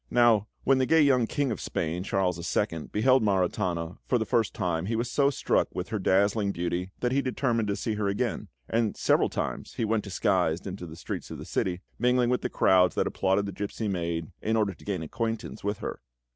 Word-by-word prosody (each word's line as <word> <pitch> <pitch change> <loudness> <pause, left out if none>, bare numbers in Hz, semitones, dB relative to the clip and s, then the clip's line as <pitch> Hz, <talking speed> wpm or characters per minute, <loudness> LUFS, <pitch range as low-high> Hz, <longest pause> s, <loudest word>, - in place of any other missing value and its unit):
Now, 115 -4 +4 0.2
when 135 0 +4
the 130 - +2
gay 160 -1 +5
young 130 -5 +4
King 140 0 0
of 105 - -4
Spain, 85 +2 -2
Charles 95 -3 0 0.2
II., 85 -7 -1
beheld 130 +4 +4
Maritana 90 -4 0
for 125 - +3
the 110 - -1
first 115 0 +1
time 85 0 -1
he 115 - 0
was 115 +2 -2
so 140 -1 +3
struck 140 - +1
with 90 - -3
her 110 - -2
dazzling 100 +2 +2
beauty 90 +1 -2
that 125 - +1
he 140 +2 +2
determined 120 -4 0
to 100 - 0
see 110 - -2
her 105 -1 -1
again; 100 0 -1 0.2
and 115 -2 0
several - - +3
times - - -4
he 115 - 0
went 110 0 0
disguised 90 -3 0
into 95 -2 -6
the 80 - -9
streets 85 - -6
of - - -6
the - - -8
city, 90 -1 -1 0.2
mingling 125 +1 +3
with 125 - +1
the - - -2
crowds 90 -1 +4
that - - +1
applauded 95 +1 +1
the 100 - -4
gipsy 105 +2 -4
maid, 85 -4 -2
in 110 +1 0
order 105 -3 +1
to - - -18
gain 95 -5 -2
acquaintance 115 +7 -4
with 100 +1 -1
her. - - -5
100 Hz, 215 wpm, -28 LUFS, 90-115 Hz, 0.2 s, gay